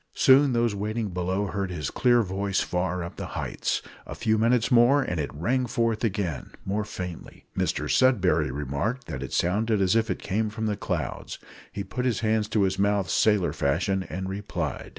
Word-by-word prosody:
Soon 135 0 +5
those 120 -2 +2
waiting 105 +2 -2
below 90 +2 -1
heard 100 -1 -3
his 85 -4 -4
clear 120 -2 +3
voice 100 0 -1
far 90 0 -1
up 85 - -8
the - - -5
heights. - - -2 0.2
A - - -6
few 110 -2 +1
minutes 115 +3 +2
more, 125 +4 +5
and 90 -8 -3
it 75 - -2
rang 125 - 0
forth 115 -1 0
again 95 - -2
more 105 +2 -1
faintly. 90 -4 -8
Mr - - -1
Sudberry 95 - +3
remarked 75 - -3
that 65 - -6
it 70 - -6
sounded 105 +5 +1
as 95 +1 +3
if 115 0 +2
it - - -1
came 105 +3 -1
from 110 +1 -4
the 105 -1 0
clouds: - - -4 0.3
he 100 - -4
put 125 +6 -4
his 125 -3 0
hands 110 -1 +1
to 105 -2 +1
his 95 0 0
mouth 100 -1 +1
sailor 105 -5 +3
fashion, 90 +7 0
and 95 +1 -4
replied. 100 +2 -4
100 Hz, 190 wpm, -26 LUFS, 90-115 Hz, 0.3 s, Soon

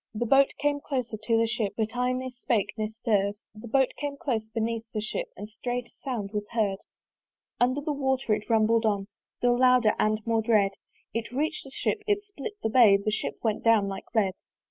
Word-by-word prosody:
The 235 +3 -1
Boat 270 +3 +6
came 290 0 +1
closer 255 -6 -3
to 220 +2 0
the 230 - +3
Ship, 220 -2 -2
But 220 +1 -1
I 250 +1 +1
ne 255 0 -3
spake 220 -5 -1
ne 215 -1 -2
stirr'd! 210 -3 0 0.2
The 215 +2 -10
Boat 265 +3 +3
came 285 -1 -3
close 230 -6 -2
beneath 225 0 -2
the - - +1
Ship, 365 - -3
And 210 - -6
strait 245 +3 -4
a - - -30
sound 230 -7 -3
was 210 0 -3
heard! 205 -4 +1 0.8
Under 255 +4 +2
the 300 +1 -2
water 265 -4 0
it 210 - -3
rumbled 225 0 +3
on, 200 -2 0 0.3
Still 245 0 +2
louder 250 -4 +5
and 215 0 +2
more 225 -1 +2
dread: 210 -3 +3 0.4
It 230 0 -3
reach'd 290 +2 -2
the - - -11
Ship, 420 - -1
it 410 -1 +1
split 405 -1 -7
the 220 - +1
bay; 220 -4 +7
The 200 +2 -2
Ship 215 - -2
went 220 -2 0
down 225 -3 +4
like 195 - -6
lead. 200 -4 +3
230 Hz, 210 wpm, -27 LUFS, 215-255 Hz, 0.8 s, bay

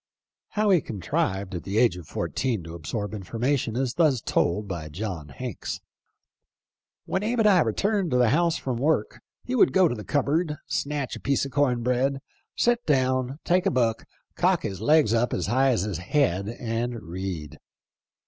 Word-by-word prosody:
How 210 -1 +3
he 180 -4 +5
contrived 95 -2 -2
at 90 - -3
the 100 +2 -3
age 115 -6 +4
of 90 -4 -10
fourteen 120 -9 -2
to 80 +1 -9
absorb 95 +6 -4
information 115 +5 -1
is 130 -1 0
thus 150 -5 +3
told 100 0 0
by 85 -5 -5
John 85 -3 -5
Hanks: 70 - -5 1.3
"When 190 - -1
Abe 230 +2 0
and 215 - +5
I 195 -3 +6
returned 195 - +1
to 125 - +2
the 125 -2 +4
house 170 +3 +2
from 130 -6 -3
work 140 -4 0 0.2
he 250 - -4
would 210 - +4
go 185 -2 +5
to 150 - -1
the 105 -3 -6
cupboard, 150 +4 0
snatch 145 -2 -2
a - - -8
piece 140 +1 +1
of 140 - -7
corn 130 -4 +1
bread, 130 +3 +1 0.4
sit 240 0 +2
down, 130 -2 +1
take 180 +2 +2
a - - +5
book, 115 - 0 0.3
cock - - +2
his 95 0 -4
legs 150 -2 +4
up 115 +1 +1
as 90 - -1
high 130 +6 +3
as 115 -8 +1
his 100 -5 -3
head, 100 - +1
and 115 +1 -3
read. 85 -3 -6
125 Hz, 180 wpm, -26 LUFS, 100-145 Hz, 1.3 s, I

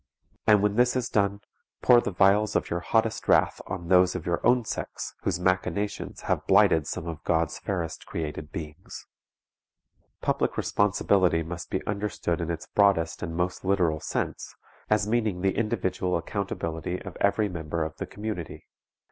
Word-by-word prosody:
And 105 -2 +6
when 105 +1 +1
this 125 +1 +4
is 125 -1 -1
done, 100 -1 +1 0.4
pour 120 -1 +7
the - - -2
vials 100 +3 +3
of - - 0
your 85 - 0
hottest 110 +5 0
wrath - - +3
on 85 -3 -5
those 90 0 +4
of 90 -3 -4
your 85 -1 -1
own 120 0 +4
sex - - -5
whose - - -1
machinations 95 +2 -1
have - - -1
blighted 80 -2 +5
some 85 -2 -4
of 80 -3 -6
God's 80 -2 0
fairest 85 -5 -4
created 75 -1 -5
beings. 80 +2 -8 1.1
Public - - 0
responsibility 95 -4 +2
must 85 +2 -7
be 95 - -2
understood 100 -4 -2
in 85 - -3
its 85 -1 -4
broadest 95 -5 +2
and 85 -2 -4
most 90 +1 -2
literal 90 -5 +2
sense, - - -4 0.3
as 105 -1 +2
meaning 110 -5 0
the 95 0 +1
individual 95 -5 0
accountability 85 -2 -3
of - - -8
every 105 +1 +2
member 85 -3 -3
of 80 0 -6
the - - -4
community. 105 -5 -6
90 Hz, 160 wpm, -27 LUFS, 85-105 Hz, 1.1 s, pour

